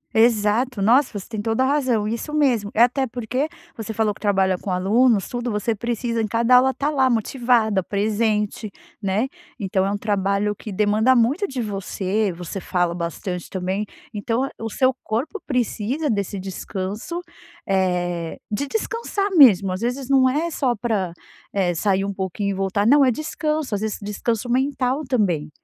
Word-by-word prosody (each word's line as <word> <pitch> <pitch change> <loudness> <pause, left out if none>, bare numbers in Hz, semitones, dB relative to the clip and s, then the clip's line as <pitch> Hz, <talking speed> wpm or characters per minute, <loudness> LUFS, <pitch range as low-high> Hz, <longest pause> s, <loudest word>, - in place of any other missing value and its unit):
Exato, 225 +1 +3
nossa, 235 +1 +3
você 190 - -7
tem 220 -3 -4
toda 225 +4 +1
a - - +2
razão. 255 -7 +1
Isso 235 +7 -4
mesmo. 245 -9 +2
É 230 - +6
até 260 +2 +2
porque 250 +5 -2 0.3
você 225 -1 -5
falou 215 -1 +1
que - - -19
trabalha 190 -3 +2
com 200 - -6
alunos, 205 +3 +3
tudo 245 0 -3
você 210 +2 0
precisa 235 +1 -2
em 215 - -1
cada 235 +3 +3
aula 260 +1 +5
estar 280 +2 -1
lá 265 -3 +3
motivada, 230 -3 +2
presente, 210 +1 -1 0.3
né. 200 +6 0 0.3
Então 190 -1 0
é 200 - 0
um 205 - -1
trabalho 200 0 0
que 210 - -8
demanda 215 +5 +3
muito 280 - +2
de 260 -2 -4
você. 200 0 -1
Você 175 +3 -6
fala 175 -2 0
bastante 175 +1 -4
também. 190 +3 -2 0.3
Então 230 +5 -1
o 225 0 -4
seu 260 +4 +2
corpo 260 - -3
precisa 250 +3 -1
desse 200 -1 -2
descanso, 195 - -5 0.5
eh, 180 -3 0
de 280 +8 -1
descansar 415 - -2
mesmo. 200 - +7
Às 185 +3 -4
vezes 250 +2 -2
não 260 -1 +5
é 320 +5 -1
só 255 -5 0
para, 205 -5 -1 0.4
eh, 185 -3 +1
sair 195 +2 +1
um 200 - -3
pouquinho 195 +1 -2
e - - -1
voltar. 195 +2 0
Não, 280 +4 +6
é 260 - +5
descanso, 305 0 -2
às 205 - -1
vezes 220 -1 -2
descanso 220 +3 -2
mental 265 +2 0
também, 185 - 0
220 Hz, 170 wpm, -22 LUFS, 195-255 Hz, 0.5 s, mesmo